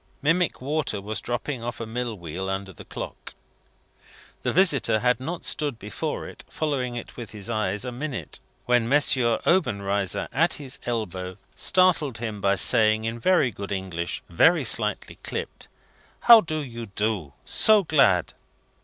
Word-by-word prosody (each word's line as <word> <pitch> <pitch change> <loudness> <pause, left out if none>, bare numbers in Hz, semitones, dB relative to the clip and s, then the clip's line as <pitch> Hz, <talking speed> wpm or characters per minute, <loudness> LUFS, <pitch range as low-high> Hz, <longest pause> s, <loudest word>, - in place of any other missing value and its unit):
Mimic 165 +1 +1
water 145 -6 -1
was 105 +2 -4
dropping 120 +1 -4
off 120 0 -5
a 115 - -4
mill 120 0 -4
wheel 90 +2 -5
under 95 0 -4
the - - -12
clock. - - -8 1.1
The - - -1
visitor 165 - +3
had 125 +3 +1
not 165 +6 -5
stood 145 -6 0
before 105 -3 -5
it, - - -12
following 135 -6 -2
it 120 - -8
with 120 -3 -7
his 105 +1 -7
eyes, 105 -2 -1
a 125 - -4
minute, 135 +1 -5 0.3
when 120 -1 +2
M. 145 - +6 0.5
Obenreizer, 100 - +1
at 165 +6 +3
his 135 -3 -5
elbow, 95 -6 -3 0.2
startled 175 -9 +2
him 110 -3 -5
by 100 0 +2
saying, 110 +2 +3
in 115 +1 -3
very 155 -3 +3
good 100 -1 -7
English, 95 -3 -4
very - - +4
slightly - - +1
clipped: - - -6 0.5
"How 235 -2 +9
do 155 -4 -3
you 115 -3 -7
do? 100 -7 -2
So 215 -2 +5
glad!" 135 - +3
115 Hz, 155 wpm, -25 LUFS, 100-145 Hz, 1.1 s, How